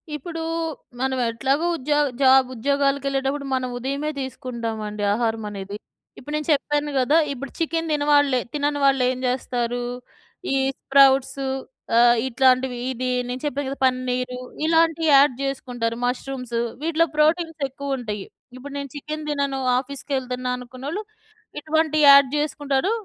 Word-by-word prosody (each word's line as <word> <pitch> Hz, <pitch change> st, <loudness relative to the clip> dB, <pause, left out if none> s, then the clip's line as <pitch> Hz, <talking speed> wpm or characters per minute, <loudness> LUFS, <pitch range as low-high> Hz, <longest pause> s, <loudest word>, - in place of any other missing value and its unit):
ఇప్పుడు 325 Hz, +3 st, -6 dB, 0.6 s
మనం 265 Hz, 0 st, 0 dB
ఎట్లాగో 270 Hz, +7 st, 0 dB
ఉద్యోగ 295 Hz, +2 st, +1 dB, 0.2 s
జాబ్ 265 Hz, -1 st, +6 dB
ఉద్యోగాలగెళ్ళేటప్పుడు 275 Hz, +1 st, 0 dB
మనం 255 Hz, -1 st, -2 dB
ఉదయమే 280 Hz, +4 st, -2 dB
తీసుకుంటామండి 230 Hz, -5 st, -4 dB
ఆహారమనేది. 210 Hz, -3 st, -3 dB, 0.4 s
ఇప్పుడు 295 Hz, +4 st, -8 dB
నేను 300 Hz, +1 st, -3 dB
చెప్పాను 295 Hz, +1 st, -1 dB
గదా! 280 Hz, +5 st, +3 dB, 0.2 s
ఇప్పుడు 275 Hz, +1 st, -7 dB
చికెన్ 330 Hz, 0 st, -1 dB
తినవాళ్ళే 290 Hz, -3 st, +3 dB
తినని 290 Hz, 0 st, 0 dB
వాళ్ళెం 255 Hz, -2 st, +2 dB
జెస్తారు, 245 Hz, -1 st, -1 dB, 0.7 s
ఈ -, -, +2 dB, 0.3 s
స్ప్రౌట్సు 270 Hz, 0 st, +4 dB, 0.5 s
ఆహ్, 240 Hz, 0 st, +6 dB
ఇట్లాంటివి 255 Hz, 0 st, +2 dB
ఇది 255 Hz, 0 st, -3 dB, 0.2 s
నేను 250 Hz, +1 st, -4 dB
చెప్పాను 285 Hz, -1 st, -2 dB
గదా! 275 Hz, -, -6 dB
పన్నీరు, 250 Hz, 0 st, -1 dB, 0.3 s
ఇలాంటియి 325 Hz, -1 st, +3 dB
యాడ్ 275 Hz, -1 st, +6 dB
జేసుకుంటారు. 245 Hz, -4 st, -2 dB
ముష్రూమ్సు 250 Hz, -1 st, -3 dB, 0.2 s
వీటిలో 330 Hz, +1 st, +2 dB
ప్రోటీన్స్ 325 Hz, +1 st, +2 dB
ఎక్కువుంటాయి. 250 Hz, -7 st, -4 dB, 0.3 s
ఇప్పుడు 280 Hz, +2 st, -9 dB
నేను 280 Hz, 0 st, -5 dB
చికెన్ 305 Hz, +1 st, -5 dB
తినను 280 Hz, -2 st, -1 dB, 0.2 s
ఆఫీస్‌కెళ్తున్నా 260 Hz, -2 st, -4 dB
అనుకున్నోళ్ళు 260 Hz, -, -6 dB, 0.6 s
ఇటువంటియి 310 Hz, 0 st, +1 dB
యాడ్ 280 Hz, -1 st, +9 dB
జేసుకుంటాడు. 295 Hz, +3 st, 0 dB
270 Hz, 115 wpm, -23 LUFS, 250-290 Hz, 0.7 s, యాడ్